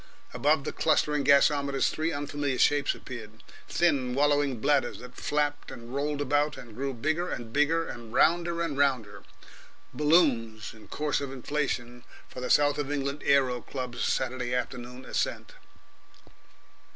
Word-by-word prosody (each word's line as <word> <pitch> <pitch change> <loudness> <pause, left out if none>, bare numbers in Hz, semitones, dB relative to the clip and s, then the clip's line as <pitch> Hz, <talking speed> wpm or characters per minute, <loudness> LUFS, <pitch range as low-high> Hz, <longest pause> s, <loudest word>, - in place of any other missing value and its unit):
Above 145 0 +2
the - - -3
clustering 150 -2 +2
gasometers 140 0 +3
three 160 +1 -1
unfamiliar 145 -2 -2
shapes 145 -1 +3
appeared, 110 -3 -10 0.3
thin, 140 -8 +1
wallowing 145 -3 +2
bladders 140 0 +1
that 125 0 -11
flapped 145 +2 -1
and 120 +1 -10
rolled 145 +1 -1
about, 145 +2 +1
and 120 -3 -11
grew 135 +4 -3
bigger 155 +8 -1
and 115 -1 -6
bigger 160 +3 +2
and 115 -2 -8
rounder 170 +5 +2
and 145 -4 -3
rounder 130 -7 0 0.7
balloons 140 -9 +2
in 110 -1 -15
course 150 -1 -1
of 140 -2 -4
inflation 125 -3 -3 0.2
for 125 - -9
the 125 - -3
South 145 0 +4
of 145 -1 -2
England 140 0 -2
Aero 130 -3 +3
Club's 125 -3 -5
Saturday 125 -1 -1
afternoon 125 0 -5
ascent. - - -2
140 Hz, 140 wpm, -28 LUFS, 125-145 Hz, 0.7 s, South